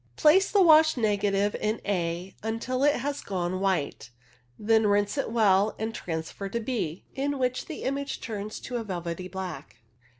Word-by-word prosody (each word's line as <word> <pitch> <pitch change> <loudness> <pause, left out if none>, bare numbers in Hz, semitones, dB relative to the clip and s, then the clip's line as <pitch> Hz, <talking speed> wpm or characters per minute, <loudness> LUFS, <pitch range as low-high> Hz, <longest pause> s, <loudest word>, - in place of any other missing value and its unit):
Place 370 +6 +5
the 405 -2 +5
washed 315 -3 +6
negative 205 -2 +1
in 215 +1 -1
A 175 -1 -2
until 230 +4 -2
it 290 0 +4
has 280 +3 -3
gone 185 -1 -2
white, 185 -10 -1 0.5
then 220 0 +3
rinse 205 0 +2
it 275 - -1
well 210 -2 +3
and 220 +1 -3
transfer 165 +2 -5
to 235 - -2
B, 215 -8 -3
in 280 +1 -1
which 255 -1 -1
the 315 - -6
image 280 +1 -2
turns 215 -1 -5
to 245 - -4
a 230 - -3
velvety 180 -2 -4
black. 185 -9 -7
210 Hz, 165 wpm, -27 LUFS, 190-255 Hz, 0.5 s, washed